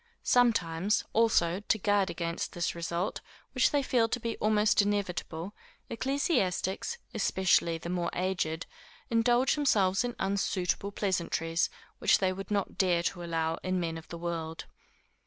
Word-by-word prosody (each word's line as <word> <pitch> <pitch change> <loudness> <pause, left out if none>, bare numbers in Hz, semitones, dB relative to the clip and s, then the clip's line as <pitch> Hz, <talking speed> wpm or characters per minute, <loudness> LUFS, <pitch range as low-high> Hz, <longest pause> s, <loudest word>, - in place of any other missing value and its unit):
Sometimes, 205 -6 +2
also, 195 -6 +3
to 210 +1 0
guard 205 -1 +2
against 170 0 -3
this 175 -1 -1
result, 170 +2 -3 0.3
which - - +3
they 290 -2 +1
feel 235 -3 +2
to 245 - -1
be 230 -1 -3
almost 215 0 +3
inevitable, 195 -3 -2 0.4
ecclesiastics, 260 - 0 0.2
especially 175 -3 +2
the 165 - -8
more 175 -1 -1
aged, 175 -3 -1 0.5
indulge 240 +3 +3
themselves 205 -9 +2
in 245 -1 -3
unsuitable 195 0 -1
pleasantries, 170 -4 0 0.3
which - - +5
they 185 -1 +1
would 195 0 -7
not 205 -2 -2
dare 175 -3 +3
to 175 +1 -2
allow 165 -1 -1
in 185 0 -1
men 165 -2 -2
of 165 0 -9
the 170 - -7
world. 165 -1 -4
185 Hz, 140 wpm, -30 LUFS, 170-215 Hz, 0.5 s, which